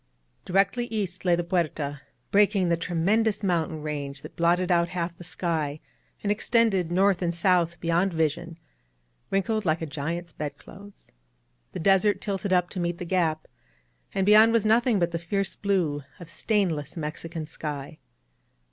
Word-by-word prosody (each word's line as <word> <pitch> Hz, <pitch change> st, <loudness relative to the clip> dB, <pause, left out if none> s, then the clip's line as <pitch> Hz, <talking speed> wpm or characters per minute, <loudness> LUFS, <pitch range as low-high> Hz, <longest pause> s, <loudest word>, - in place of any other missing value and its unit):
Directly 195 Hz, +6 st, +2 dB
east 195 Hz, -5 st, -4 dB
lay 175 Hz, -1 st, +4 dB
the 175 Hz, -, -1 dB
Puerta, 155 Hz, -5 st, -2 dB, 0.3 s
breaking 200 Hz, -3 st, +3 dB
the 170 Hz, -, +3 dB
tremen 175 Hz, +6 st, +1 dB
dous 220 Hz, -2 st, -1 dB
mountain 165 Hz, -4 st, 0 dB
range 140 Hz, -2 st, -5 dB
that -, -, -10 dB
blotted 175 Hz, +2 st, +2 dB
out 170 Hz, -1 st, +3 dB
half 170 Hz, -1 st, -3 dB
the 175 Hz, -, -11 dB
sky 160 Hz, -3 st, -2 dB, 0.4 s
and 205 Hz, -, +1 dB
extended 210 Hz, -5 st, +2 dB
north 190 Hz, +1 st, +3 dB
and 170 Hz, -1 st, 0 dB
south 170 Hz, -1 st, +2 dB
beyond 170 Hz, +3 st, +1 dB
vision, 165 Hz, +1 st, -1 dB, 0.7 s
wrinkled 215 Hz, +3 st, 0 dB
like 160 Hz, -3 st, +1 dB
a 160 Hz, -, -3 dB
giant's 165 Hz, +4 st, -4 dB
bed 150 Hz, -1 st, -5 dB
clothes. 200 Hz, 0 st, -15 dB, 0.6 s
The -, -, -4 dB
desert 195 Hz, +4 st, +3 dB
tilted 200 Hz, -1 st, -3 dB
up 180 Hz, -1 st, +2 dB
to 190 Hz, -, -4 dB
meet 175 Hz, 0 st, -1 dB
the 180 Hz, -, -6 dB
gap, 165 Hz, -3 st, 0 dB, 0.6 s
and 195 Hz, -1 st, 0 dB
beyond 215 Hz, +2 st, +7 dB
was 225 Hz, -2 st, +2 dB
nothing 230 Hz, +1 st, +3 dB
but 170 Hz, -2 st, +1 dB
the 170 Hz, -, -2 dB
fierce 195 Hz, +3 st, -2 dB
blue 180 Hz, -8 st, 0 dB, 0.2 s
of 170 Hz, -2 st, -10 dB
stainless 170 Hz, -, -1 dB
Mexican 160 Hz, +1 st, -5 dB
sky. 150 Hz, 0 st, -6 dB
175 Hz, 160 wpm, -26 LUFS, 160-195 Hz, 0.7 s, beyond